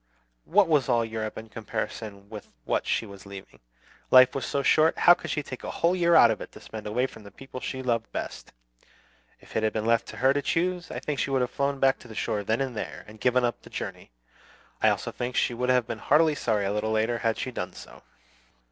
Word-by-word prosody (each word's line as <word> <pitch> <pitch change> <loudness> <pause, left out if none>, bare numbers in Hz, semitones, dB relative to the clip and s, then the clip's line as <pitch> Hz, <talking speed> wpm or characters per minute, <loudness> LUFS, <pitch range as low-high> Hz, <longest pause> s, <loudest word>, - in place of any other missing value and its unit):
What 195 +2 +4
was 145 -5 +2
all 120 -2 +3
Europe 110 -1 -4
in 110 0 -8
comparison 110 -2 -5
with 105 -1 -9 0.2
what - - -1
she - - 0
was 100 -1 -12
leaving? 100 -1 -11 0.5
Life 130 0 +7
was 135 - -3
so 140 - -1
short, 155 +3 +4
how 175 - +8
could 175 - -6
she 150 - -1
take 130 -2 -8
a - - -4
whole 170 +2 +1
year 170 -2 +3
out - - +8
of - - -3
it - - -8
to - - -11
spend 110 -1 -8
away 120 +5 +1
from 130 - -9
the 100 - -12
people 130 +5 -10
she 130 +1 -5
loved 115 -2 -1
best? - - -6 0.9
If - - -15
it 110 - +2
had 110 0 0
been 110 0 -2
left 115 0 +2
to - - -9
her 130 +1 +4
to 145 - 0
choose, 180 +4 -1
I - - -5
think 145 -3 -3
she - - 0
would 135 -1 +1
have 125 - -1
flown 140 0 -1
back 135 0 +3
to - - -14
the 110 - -11
shore 105 -1 -1
then 110 +5 0
and 130 -3 -2
there, 105 - -6
and 105 0 -14
given 125 0 +3
up 120 - -2
the - - -14
journey, - - -6 0.7
I - - +5
also - - -1
think 125 +1 -4
she - - +2
would 125 +2 -2
have 125 -2 +3
been 115 -1 -5
heartily 155 +5 +4
sorry 110 -7 0
a 100 - -1
little 105 +1 -1
later, 110 +2 +1
had 115 -1 0
she 130 - -3
done 90 -7 -5
so. - - -12
120 Hz, 245 wpm, -27 LUFS, 110-135 Hz, 0.9 s, how